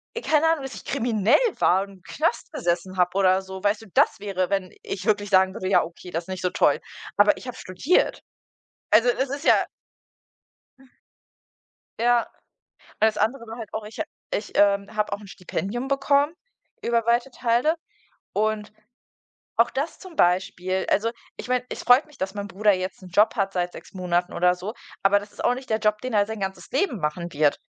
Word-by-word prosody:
e 465 - -3
keine 310 -4 +3
Ahnung, 325 -3 +2
dass 270 - -6
ich - - -10
kriminell 225 -2 +2 0.2
war 190 +2 +4
und 200 - -10
im 185 - -18
Knast 320 +1 -1
gesessen 185 - -1
habe 180 +1 +2
oder 190 -1 +4
so. 190 0 -9
Weißt 205 +1 +1
du, 220 - -13
das - - +3
wäre, 195 -3 -2
wenn 195 -2 -1
ich 185 -1 -5
wirklich 205 -2 +1
sagen 190 -1 +4
würde: 185 -4 -4
„Ja - - +5
okay, 175 +1 -10
das 165 +1 -3
ist - - -17
nicht 185 0 -4
so 180 - +2
toll.“ 150 -4 +3 0.4
Aber 205 0 +6
ich - - -10
habe 250 - -6
studiert. 185 - +1 0.7
Also, 230 +4 +6
es 260 +2 0
ist 280 +3 -4
ja - - +7 2.4
Ja. 240 0 +3 0.7
Weil's 215 -1 +3
andere 230 +4 0
war 225 +1 -8
halt 220 -3 -8
auch, 220 -1 -4
ich 215 - -11
ha - - +1 0.3
ich, 210 - -3
ähm, 200 +1 +3
habe 210 -1 -1
auch 200 - -2
'n 205 - -12
Stipendium 200 +7 -4
bekommen 280 +3 +2 0.5
über 235 -1 +1
weite 240 +3 +2
Teile. 245 +6 +1 0.6
Und 215 0 -1 0.8
auch 230 - +4
das 285 +5 -3
zum 370 -4 -12
Beispiel, 185 +1 +1
also, 225 +3 +2 0.3
ich - - -7
meine, 250 0 +1
es - - -6
freut 245 +4 +6
mich, 300 -2 -19
dass 190 0 -3
mein 205 -1 -5
Bruder 205 +2 +2
jetzt 185 +1 -4
'n 185 - -10
Job 210 +5 +4
hat 195 -1 0
seit 180 -1 -1
6 - - -12
Monaten 180 -1 -1
oder 180 +1 +3
so, 190 +5 -6 0.3
aber 200 +1 +5
das 205 0 -12
ist - - -8
auch - - +4
nicht 260 +1 -8
der 220 0 +1
Job, 210 -1 +1
den 255 -2 -4
er 205 -1 +4
sein 220 0 -6
ganzes 190 -1 -5
Leben 270 - 0
machen 170 +3 -3
wird. 145 -1 +2
205 Hz, 200 wpm, -24 LUFS, 185-240 Hz, 2.4 s, ja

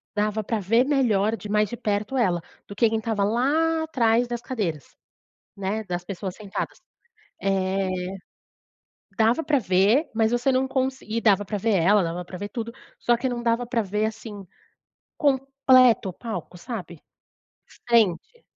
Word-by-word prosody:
dava 210 +1 0
pra 220 +2 -1
ver 225 +5 +3
melhor 230 -7 +2
de 210 - -9
mais 210 0 +2
de 240 - -6
perto 210 +5 -1
ela, 180 -8 +2 0.3
do 200 - -9
que 230 +2 +3
quem 225 - 0
estava 220 -2 -1
lá 300 +9 +1
atrás 245 -6 +2
das 240 -1 -4
cadeiras, 175 - -4 0.6
né, 200 +3 -2
das 175 -2 -4
pessoas 190 0 -5
sentadas. 205 -3 -5 0.6
Eh, 195 0 0 1.3
dava 230 +7 +3
pra 295 -3 +2
ver, 200 - +3
mas 220 0 +2
você 240 +3 +2
não 260 +1 +1
consi 265 0 -2
e 225 +2 0
dava 205 -3 +4
pra 205 +2 -3
ver 215 +1 +1
ela, 190 +3 +4
dava 170 +1 -3
pra 180 +1 -9
ver 205 +2 -5
tudo, 230 0 -5 0.3
só 240 0 +2
que 260 - -1
não 245 -1 -3
dava 235 +1 +1
pra 235 -1 0
ver, 210 +1 -1
assim, 220 -2 -6 0.7
completo 265 -5 +4
o - - -7
palco, 220 -5 -6
sabe? 175 -5 -7 0.9
Frente. 235 - +2
220 Hz, 160 wpm, -24 LUFS, 195-245 Hz, 1.3 s, dava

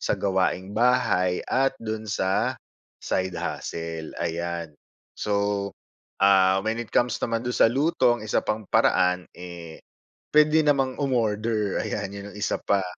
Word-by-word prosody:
sa - - 0
gawaing 95 0 0
bahay 100 -6 +2
at 135 +1 +1
do'n 110 -1 -5
sa 95 -1 0 0.5
side 95 0 -1
hustle, 80 -1 -5
ayan. 85 -1 -3 0.4
So, 100 -1 -1 0.6
ah, 95 -1 +5
when 115 +2 -1
it 120 - -6
comes 120 -2 +1
naman 115 +1 -1
do'n 125 - -1
sa - - +6
luto 135 -1 +2
ang 110 - -9
1 105 - +1
pang 110 0 -3
paraan, 90 -1 +2
eh, 85 -2 -10 0.4
puwede 150 +1 +5
namang 135 -1 +1
umorder, 110 -5 0
ayan 100 -2 -3
yan 100 0 -8
yung - - -13
1 105 - -1
pa, 100 -2 +1
105 Hz, 145 wpm, -25 LUFS, 95-120 Hz, 0.6 s, sa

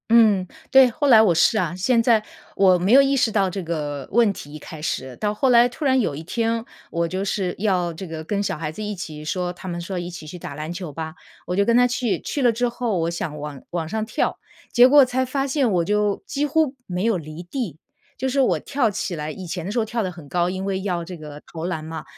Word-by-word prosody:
嗯， 220 -5 +5 0.3
对， 265 -1 +8
后 290 +5 -1
来 230 -5 +8
我 205 -6 +4
是 190 +7 +4
啊， 170 -6 0
现 230 +6 +2
在 225 -3 +4 0.3
我 185 -2 +6
没 180 +4 0
有 270 +3 +9
意 275 0 +2
识 245 -4 +2
到 200 -3 +2
这 190 +1 -4
个 150 -4 -4
问 225 -2 +4
题 145 -5 -10
一 155 - -7
开 155 -1 -10
始， 130 -4 -3
到 210 -1 -1
后 260 +5 +1
来 240 0 +6
突 270 +5 -6
然 260 -1 +4
有 170 - -1
一 150 - -6
天， 230 +5 -1 0.3
我 170 0 0
就 185 +3 -3
是 190 -2 -1
要 185 -4 +1
这 175 +4 -7
个 160 -2 -6
跟 200 +5 -1
小 190 - -2
孩 155 -1 -4
子 215 - -6
一 210 0 -3
起 155 -5 -7
说， 180 +3 -2
他 185 +1 -8
们 175 0 -4
说 180 +2 -5
一 175 0 -4
起 170 -3 -9
去 180 - -8
打 160 - -7
篮 155 +3 -5
球 175 -3 -6
吧， 160 +2 -6 0.3
我 180 - -1
就 200 - +3
跟 235 +2 +4
他 245 0 +5
去。 240 -6 -1
去 285 - -3
了 245 -2 +5
之 245 +2 0
后 235 -4 -2
我 165 0 0
想 165 -3 -4
往 145 -2 -7
往 170 -2 -2
上 220 +5 -2
跳， - - -1 0.4
结 245 - +8
果 280 0 +7
才 255 +1 0
发 270 +2 -1
现 270 -2 +1
我。 180 -3 +2
我 - - -2
就 210 +1 +1
几 290 +1 -1
乎 300 -1 +1
没 180 0 -3
有 225 -4 +2
离 155 0 -8
地， 175 - -5 0.4
就 265 +2 -2
是 275 +2 0
我 265 - +3
跳 265 -6 0
起 190 -2 -3
来， 150 0 -4
以 185 +2 -8
前 170 0 -4
的 195 - -3
时 240 - 0
候 220 - +1
跳 230 +1 -2
得 185 - -2
很 160 -5 -12
高， 175 +2 +1
因 185 +1 -3
为 195 -1 -1
要 180 -4 -1
这 180 +1 -8
个 150 -1 -10
投 165 0 -5
篮 165 -3 -3
嘛， 160 0 -6
190 Hz, 285 characters per minute, -23 LUFS, 170-235 Hz, 0.4 s, 有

